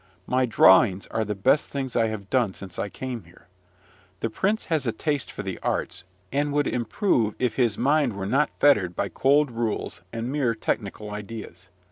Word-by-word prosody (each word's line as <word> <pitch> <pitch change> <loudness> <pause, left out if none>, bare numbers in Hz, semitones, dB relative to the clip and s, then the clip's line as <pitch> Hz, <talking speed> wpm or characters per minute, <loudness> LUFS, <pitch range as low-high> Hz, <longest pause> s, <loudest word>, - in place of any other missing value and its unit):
My 130 0 +1
drawings 95 -2 +5
are 110 - 0
the 105 -1 -3
best 130 +10 +2
things 135 -3 -4
I 115 -1 +3
have 105 -2 -6
done 120 -7 +2
since 95 -3 -9
I 100 - -2
came 125 -3 -6
here. 85 +2 -20 0.8
The 115 - -1
prince 205 - 0
has 155 -6 0
a - - +2
taste 145 +5 -2
for 105 - -6
the 95 -3 -5
arts, - - -2 0.3
and 145 +2 0
would 145 0 +2
improve 120 - 0
if 125 -2 0
his 120 -6 +2
mind 140 -2 +2
were 100 -1 -4
not 135 +9 +2
fettered 100 -12 +4
by 100 - -1
cold 140 - +3
rules 115 -6 -3
and 115 +2 -4
mere 135 -6 +1
technical 105 -1 -3
ideas. 105 -4 -8
115 Hz, 185 wpm, -25 LUFS, 100-135 Hz, 0.8 s, drawings